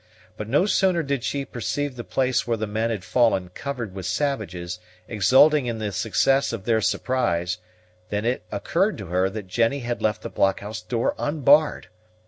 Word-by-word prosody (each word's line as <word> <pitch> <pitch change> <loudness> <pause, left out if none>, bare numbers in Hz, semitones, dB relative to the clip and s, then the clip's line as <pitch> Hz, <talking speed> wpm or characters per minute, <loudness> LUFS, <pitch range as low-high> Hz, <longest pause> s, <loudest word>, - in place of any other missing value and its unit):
But 105 0 -6
no 145 +9 +3
sooner 190 -4 +2
did 140 -4 -2
she 140 -1 -2
perceive 140 +3 -3
the 120 - -6
place 130 -1 0
where 115 -1 0
the 110 - -2
men 110 +2 -1
had 105 -5 -3
fallen 95 -3 +2
covered 120 0 -5
with 95 -2 -5
savages, 90 - -2 0.3
exulting 130 +7 +4
in 115 -1 -2
the 110 -2 -3
success 115 +8 +2
of 115 -4 -5
their 115 -2 +2
surprise, 90 -8 0 0.5
than 105 +1 -2
it 125 +2 0
occurred - - 0
to - - -7
her 90 +2 +1
that 105 0 -6
Jennie 115 +8 0
had 120 0 -3
left 105 -1 0
the - - -4
blockhouse 100 +2 0
door 115 0 -1
unbarred. 145 +1 +3
115 Hz, 175 wpm, -24 LUFS, 100-135 Hz, 0.5 s, exulting